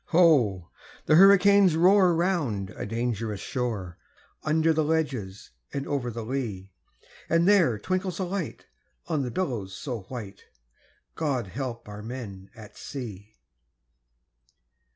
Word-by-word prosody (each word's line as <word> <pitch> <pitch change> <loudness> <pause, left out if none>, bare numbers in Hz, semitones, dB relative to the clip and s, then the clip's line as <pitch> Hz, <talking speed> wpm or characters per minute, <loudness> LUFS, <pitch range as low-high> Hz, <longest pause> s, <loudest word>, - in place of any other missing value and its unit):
Ho! 130 - +3 0.3
the - - +3
hurricanes 195 0 +6
roar 180 +1 +5
round 145 - -1
a - - -6
dangerous 115 -2 -2
shore, 110 - -4 0.4
Under 160 +1 +2
the 155 0 +1
ledges 140 -11 -2 0.2
and 140 0 -3
over 135 -4 -2
the 115 -1 -6
lea; 110 -7 -4 0.6
And 165 +2 +3
there 175 - +4
twinkles 185 - -2
a 190 - -1
light 185 -3 -4 0.4
on 155 -4 -1
the 125 - -2
billows 120 - -3
so 125 -5 -5
white 105 -4 -8 0.7
God 140 -7 -1
help 120 +1 -5
our 105 0 -8
men 105 -5 -8
at 110 -3 -13
sea! 110 -6 -8
130 Hz, 125 wpm, -26 LUFS, 105-165 Hz, 0.7 s, hurricanes